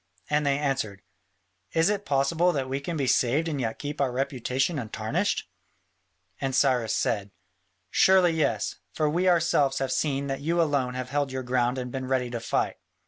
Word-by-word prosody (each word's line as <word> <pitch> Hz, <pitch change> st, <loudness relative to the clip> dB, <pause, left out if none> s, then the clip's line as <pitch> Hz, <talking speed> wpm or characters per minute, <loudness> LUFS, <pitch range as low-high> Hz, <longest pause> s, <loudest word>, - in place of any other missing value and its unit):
And 150 Hz, 0 st, +2 dB
they 140 Hz, 0 st, +2 dB
answered, 135 Hz, -9 st, -2 dB, 0.7 s
"Is 165 Hz, 0 st, +3 dB
it 205 Hz, 0 st, -3 dB
possible 155 Hz, +6 st, +2 dB
that 135 Hz, -4 st, -2 dB
we 135 Hz, +1 st, -2 dB
can 160 Hz, +4 st, -4 dB
be 140 Hz, -, 0 dB
saved 130 Hz, +6 st, +2 dB
and 145 Hz, -4 st, -2 dB
yet 115 Hz, -2 st, -2 dB
keep 145 Hz, 0 st, -4 dB
our 135 Hz, -2 st, +1 dB
reputation 135 Hz, +3 st, -1 dB
untarnished?" 110 Hz, -5 st, -2 dB, 0.9 s
And 135 Hz, -1 st, -1 dB
Cyrus 125 Hz, -4 st, +2 dB
said, 100 Hz, -1 st, -1 dB, 0.6 s
"Surely 185 Hz, -2 st, +5 dB
yes, 160 Hz, -2 st, 0 dB, 0.2 s
for 155 Hz, -, +1 dB
we 175 Hz, +5 st, +2 dB
ourselves 150 Hz, -6 st, +3 dB
have 135 Hz, -1 st, -1 dB
seen 140 Hz, -2 st, 0 dB
that 135 Hz, 0 st, -3 dB
you 165 Hz, +4 st, 0 dB
alone 140 Hz, -6 st, +1 dB
have 130 Hz, 0 st, -4 dB
held 145 Hz, -1 st, 0 dB
your 130 Hz, 0 st, -3 dB
ground 125 Hz, 0 st, +1 dB
and 125 Hz, -1 st, -4 dB
been 130 Hz, 0 st, -4 dB
ready 125 Hz, -2 st, 0 dB
to 120 Hz, -, -3 dB
fight." 115 Hz, -, -1 dB
135 Hz, 180 wpm, -27 LUFS, 130-150 Hz, 0.9 s, Surely